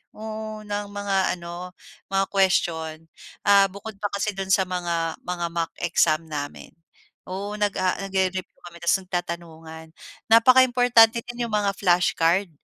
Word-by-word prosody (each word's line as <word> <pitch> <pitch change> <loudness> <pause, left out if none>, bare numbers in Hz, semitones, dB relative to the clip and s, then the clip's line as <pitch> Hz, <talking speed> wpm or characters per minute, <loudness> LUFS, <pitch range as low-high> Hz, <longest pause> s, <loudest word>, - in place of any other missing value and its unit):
Oo, 215 0 -6
ng 205 0 -4
mga 200 -2 0
ano, 175 +1 -8 0.4
mga 195 0 +2
question, 165 -5 0 0.4
ah, 200 -1 +7
bukod 200 +2 -9
pa 205 -1 -2
kasi 200 +1 -1
do'n 195 0 -5
sa 195 - +4
mga, 170 -3 -2
mga 175 -1 -3
mock 165 -1 -2
exam 165 -2 +2
namin, 145 -1 -6 0.6
oo, 200 +3 -5
nag-a-a 195 -2 0
nagre-review 190 -1 -2
kami 170 -1 -11
tapos 170 +3 +3
nagtatanungan. 165 -3 -6 0.4
Napaka-importante 245 -1 +6
din 240 0 -7
'yong 225 - -7
mga 205 -1 +1
flashcard, 175 0 +2
190 Hz, 135 wpm, -24 LUFS, 170-205 Hz, 0.6 s, ah